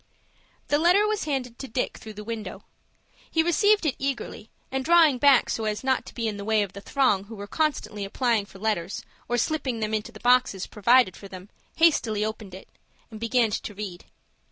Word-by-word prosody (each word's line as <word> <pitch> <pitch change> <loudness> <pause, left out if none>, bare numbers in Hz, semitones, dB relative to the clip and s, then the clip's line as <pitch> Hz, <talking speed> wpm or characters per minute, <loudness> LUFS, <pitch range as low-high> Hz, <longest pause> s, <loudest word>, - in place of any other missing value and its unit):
The 290 - +3
letter 360 +6 +4
was 425 -4 -1
handed 255 -5 -3
to 270 - -6
Dick 250 +2 -3
through 220 -1 -10
the 210 - -7
window. 225 -1 -6 0.7
He 320 - +2
received 410 +3 +3
it 295 - +2
eagerly, 270 -5 -4 0.2
and 265 0 -1
drawing 320 -4 +5
back 280 -2 +5
so 225 - -2
as 210 +2 -2
not 260 -1 0
to - - -11
be 230 -2 -2
in 210 -2 -3
the 200 - -6
way 215 0 +2
of 195 -2 -7
the 200 - -9
throng 210 -6 +1
who 225 +2 -10
were 200 -1 -7
constantly 285 -6 -2
applying 220 0 0
for 195 - -14
letters, 195 -3 -2 0.2
or 240 - +1
slipping 260 -2 -1
them 215 0 -2
into 215 -1 -2
the - - -13
boxes 245 -6 +2
provided 220 -2 +3
for 200 - -11
them, 185 +1 -11 0.3
hastily 230 -10 +3
opened 215 -3 -6
it, 190 - -12 0.4
and 220 - -9
began 230 0 +1
to 210 - -4
read. 190 -3 -7
230 Hz, 205 wpm, -25 LUFS, 210-275 Hz, 0.7 s, drawing